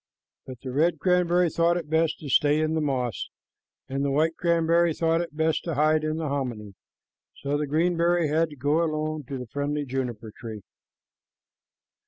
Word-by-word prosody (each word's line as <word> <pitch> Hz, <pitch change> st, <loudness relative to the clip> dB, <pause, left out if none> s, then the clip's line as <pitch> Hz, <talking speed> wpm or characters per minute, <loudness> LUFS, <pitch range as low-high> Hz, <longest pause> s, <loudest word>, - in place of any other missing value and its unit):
But 130 Hz, -2 st, -9 dB
the 130 Hz, -, -6 dB
red 160 Hz, +6 st, +2 dB
cranberry 180 Hz, -1 st, +2 dB
thought 170 Hz, +2 st, +2 dB
it 165 Hz, -4 st, -5 dB
best 160 Hz, +1 st, +1 dB
to 145 Hz, -, -6 dB
stay 145 Hz, +3 st, +3 dB
in 155 Hz, 0 st, 0 dB
the 160 Hz, -, 0 dB
moss, 125 Hz, -, -2 dB, 0.6 s
and 135 Hz, +1 st, -2 dB
the 140 Hz, -, +1 dB
white 155 Hz, +4 st, +1 dB
cranberry 170 Hz, -1 st, +2 dB
thought 165 Hz, 0 st, +1 dB
it 165 Hz, -3 st, -7 dB
best 160 Hz, 0 st, +1 dB
to 165 Hz, -3 st, -2 dB
hide 155 Hz, +2 st, +3 dB
in 155 Hz, 0 st, -1 dB
the 160 Hz, -1 st, -2 dB
hominy, 120 Hz, -8 st, -3 dB, 0.6 s
so 140 Hz, +1 st, -3 dB
the 150 Hz, 0 st, -1 dB
green 160 Hz, +5 st, +2 dB
cranberry 170 Hz, 0 st, +2 dB
had 160 Hz, +2 st, +1 dB
to 150 Hz, -, -11 dB
go 145 Hz, +5 st, +1 dB
alone 155 Hz, -2 st, -2 dB
to 135 Hz, +2 st, -5 dB
the 125 Hz, -, -6 dB
friendly 145 Hz, +4 st, -2 dB
juniper 125 Hz, -4 st, -4 dB
tree. 110 Hz, -3 st, -8 dB
155 Hz, 185 wpm, -26 LUFS, 140-165 Hz, 0.6 s, stay